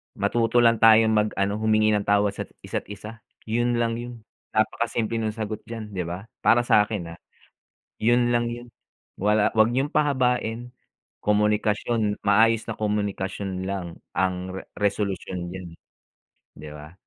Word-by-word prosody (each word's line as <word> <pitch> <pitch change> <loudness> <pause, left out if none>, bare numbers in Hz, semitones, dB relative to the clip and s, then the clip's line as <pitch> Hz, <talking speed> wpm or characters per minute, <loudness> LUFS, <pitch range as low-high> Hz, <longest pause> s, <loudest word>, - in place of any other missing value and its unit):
Matuto 120 +1 +2
lang 115 -1 +4
tayong 110 0 +6
mag 105 -1 +2
ano, 100 +2 0
humingi 110 0 +3
ng 105 -1 0
tawad 105 0 +3
sat - - -6 0.2
isa't - - -4
isa, 105 +3 -9 0.2
yun 120 +2 0
lang 115 0 0
yun. 120 -2 -8 0.3
Napakasimple 115 +1 0
nung 110 -1 -2
sagot 110 -1 -4
diyan, 115 -2 -7
'di 95 -2 -3
ba? 90 +3 -5 0.2
Para 120 +1 +4
sa'kin, 105 -6 +1
ah, 85 - -12 0.8
yun 120 +2 +3
lang 120 0 +1
yung 120 +1 -8 0.5
wala 105 +1 +2
'wag 110 +1 +4
niyong 135 +4 -1
pahabain. 125 -4 0 0.5
Komunikasyon, 105 +1 +1
maayos 115 +2 +4
na 115 - -4
komunikasyon 100 -2 -2
lang 90 -4 -5 0.2
ang 95 0 -1
re - - -7 0.2
resolusyon 95 -3 -2
diyan, 95 -1 -7
eh, - - -53 0.8
'di 75 0 -9
ba? 75 +2 -11
110 Hz, 150 wpm, -24 LUFS, 100-115 Hz, 0.8 s, tayong